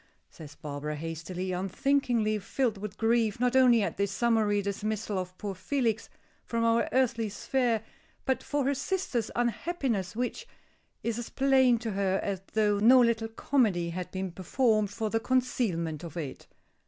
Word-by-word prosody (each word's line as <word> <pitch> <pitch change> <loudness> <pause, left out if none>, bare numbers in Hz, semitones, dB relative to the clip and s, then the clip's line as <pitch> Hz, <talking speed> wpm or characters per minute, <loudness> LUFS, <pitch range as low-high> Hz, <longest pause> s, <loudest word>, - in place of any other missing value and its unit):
says 150 -3 -11
Barbara, 150 +1 -5
hastily, 165 +4 -4
unthinkingly 215 +3 +1
filled 220 +1 -1
with 205 -1 -6
grief, 225 -2 +2
not 250 +1 +1
only 245 -4 +6
at 175 - -3
this 200 0 0
summary 215 -1 +2
dismissal 205 0 -2
of 185 0 -6
poor 205 -2 -4
Felix 225 +3 -1 0.3
from 230 -1 -1
our 230 0 +2
earthly 240 -4 +1
sphere, 235 +1 0 0.4
but 265 0 +1
for 290 -2 -1
her 280 - +2
sister's 275 - -2
unhappiness, 240 - -1
which 250 - -3 0.6
is 230 0 -1
as 240 - -6
plain 265 -3 +4
to 225 -1 -4
her 195 -1 +1
as 195 -2 -2
though 210 -2 +2
no 245 +5 +7
little 230 -2 +2
comedy 220 -7 +1
had 180 +1 -5
been 190 -1 -4
performed 215 +4 +1
for 215 +1 -3
the 225 - +2
concealment 215 - 0
of 170 -1 -8
it. 145 -6 -6
220 Hz, 155 wpm, -29 LUFS, 190-245 Hz, 0.6 s, no